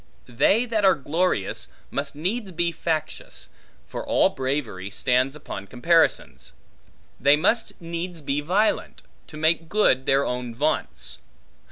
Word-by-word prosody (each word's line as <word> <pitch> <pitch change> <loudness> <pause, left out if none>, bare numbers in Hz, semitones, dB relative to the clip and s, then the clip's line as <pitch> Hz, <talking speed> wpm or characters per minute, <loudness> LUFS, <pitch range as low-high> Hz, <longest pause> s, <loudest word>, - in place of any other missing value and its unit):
They 195 - +3
that 225 -3 0
are 190 -1 +6
glorious, 145 - -1 0.2
must 140 0 -2
needs 190 +7 -2
be 170 0 0
factious; 160 -1 -3 0.4
for - - -6
all - - +3
bravery 130 -8 -3
stands 130 +6 +1
upon 100 -9 -7
comparisons. 120 - +1 0.7
They 140 +1 +6
must 220 +9 0
needs 170 +1 -5
be 145 0 -1
violent, 190 +8 0 0.2
to 155 - -10
make 160 +1 +2
good 150 -10 +3
their 135 +1 +3
own 125 -2 -3
vaunts. 150 +5 -2
150 Hz, 130 wpm, -24 LUFS, 130-175 Hz, 0.7 s, are